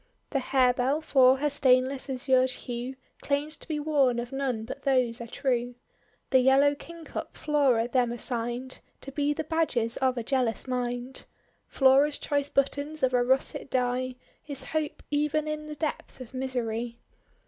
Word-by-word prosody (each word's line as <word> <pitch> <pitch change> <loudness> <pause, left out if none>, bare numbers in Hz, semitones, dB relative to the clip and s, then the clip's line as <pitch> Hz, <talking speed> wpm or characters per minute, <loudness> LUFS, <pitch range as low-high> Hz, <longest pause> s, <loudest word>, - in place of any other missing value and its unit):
The 275 - +1
Harebell, 260 +2 +2
for 265 -4 +5
her 295 +2 0
stainless 260 0 +2
azured 260 0 +2
hue, 250 0 -5 0.3
Claims 290 +2 0
to - - -10
be 310 -2 -2
worn 285 -5 +2
of 240 +1 -4
none 260 -5 -2
but 240 - -7
those 255 -3 +1
are 235 - -6
true. 245 -1 -1 0.6
Tlie 260 -1 +5
Yellow 275 +2 +5
Kingcup 330 +2 -8
Flora 275 -6 +2
them 245 -1 +1
assigned 240 +1 -3 0.2
To 275 - -8
be 290 +1 0
the 295 - -2
badges 280 -8 0
of 260 -1 +1
a 235 - -2
jealous 250 -1 0
mind. 250 0 -3 0.4
Flora's 275 +2 +4
choice 285 -1 -1
buttons 285 +2 -1
of 255 -1 +3
a 245 -1 +4
russet 265 +2 0
dye, 255 0 0 0.3
Is 280 -2 -5
Hope 310 +1 -3
even 300 +1 +1
in 305 0 -4
the 305 - -6
depth 295 -2 -4
of 255 0 -10
mi 260 +1 -2
sery. 235 -2 -3
265 Hz, 160 wpm, -28 LUFS, 245-285 Hz, 0.6 s, for